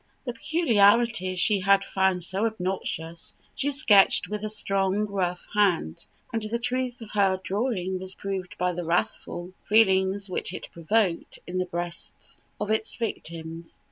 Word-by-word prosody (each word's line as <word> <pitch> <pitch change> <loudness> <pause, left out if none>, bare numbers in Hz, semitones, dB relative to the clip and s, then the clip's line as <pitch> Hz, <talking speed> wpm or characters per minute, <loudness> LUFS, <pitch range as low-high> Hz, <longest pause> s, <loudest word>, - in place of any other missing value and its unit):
The 245 - -3
peculiarities 225 - +3
she 205 +2 +4
had 195 +1 +4
found 190 -2 +1
so 195 +5 0
obnoxious 180 -5 -4 0.2
she 280 - 0
sketched 230 -9 +5
with 210 0 -4
a 215 - -2
strong, 195 -1 0
rough 185 -3 -2
hand; 185 - +1 0.3
and 225 - 0
the 215 +2 -1
truth 245 0 -2
of 220 - -9
her 195 -2 +2
drawing 190 -3 -1
was 190 0 -5
proved 190 -2 -5
by 180 0 +1
the 175 0 -4
wrathful 175 +1 -2
feelings 195 -2 +3
which 185 -1 -3
it - - -7
provoked 175 +1 0
in 185 +1 -3
the 185 - -1
breasts 175 0 -5 0.2
of 210 0 -2
its 220 0 +2
victims. 165 -7 -5
195 Hz, 150 wpm, -26 LUFS, 180-215 Hz, 0.3 s, sketched